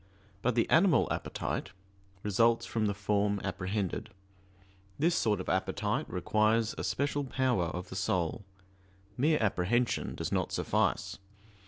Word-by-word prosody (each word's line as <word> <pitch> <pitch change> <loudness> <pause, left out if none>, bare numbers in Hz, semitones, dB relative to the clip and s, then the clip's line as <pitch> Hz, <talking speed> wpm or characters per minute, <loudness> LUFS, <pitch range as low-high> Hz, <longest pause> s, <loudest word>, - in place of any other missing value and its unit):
But 125 -1 +1
the 115 - +2
"animal 170 0 +5
appetite" - - -3 0.5
results 115 +3 +3
from 110 -2 0
the 100 - -1
form 100 0 +1
apprehended; 95 +2 -2 0.9
this 165 +4 +2
sort 105 - +1
of 95 - -6
appetite 105 +8 -1
requires 110 +4 +1
a - - -5
special 145 +1 0
power 130 -7 +1
of 90 +2 -5
the - - -7
soul 95 -2 -1 0.7
mere 150 +5 +3
apprehension 110 +3 0
does - - -4
not - - 0
suffice. - - 0
110 Hz, 130 wpm, -31 LUFS, 95-125 Hz, 0.9 s, animal